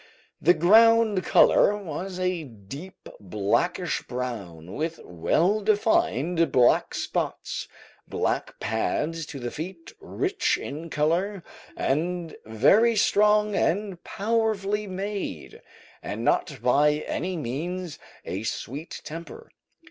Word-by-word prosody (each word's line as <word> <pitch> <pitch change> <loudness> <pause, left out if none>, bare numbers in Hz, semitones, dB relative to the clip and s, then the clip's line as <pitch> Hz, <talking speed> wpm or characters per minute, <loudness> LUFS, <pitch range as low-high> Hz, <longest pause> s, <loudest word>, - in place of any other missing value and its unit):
The 175 +3 +5
ground 220 +3 +5
colour 205 - +5
was 185 0 -6
a 180 -2 -1
deep 135 - -11
blackish 105 - 0
brown, 100 -9 -5
with 160 +1 -3
well 170 - +1
defined 180 - +2
black 125 -2 +3
spots, - - -3 0.4
black - - -2
pads 150 +8 -1
to 140 - -7
the 120 -1 -4
feet, 165 +1 -7
rich - - 0
in 155 +4 -7
colour, 170 +6 0 0.3
and 170 +3 -1
very 210 - +4
strong 210 0 +3
and 190 -1 -1
powerfully 210 -1 -1
made, 190 - -5 0.4
and - - -5
not - - 0
by 150 +1 +3
any 180 +1 -3
means 165 +6 -4 0.3
a 95 - -4
sweet 135 +7 -5
temper. 165 -1 -9
170 Hz, 105 wpm, -26 LUFS, 140-200 Hz, 0.4 s, The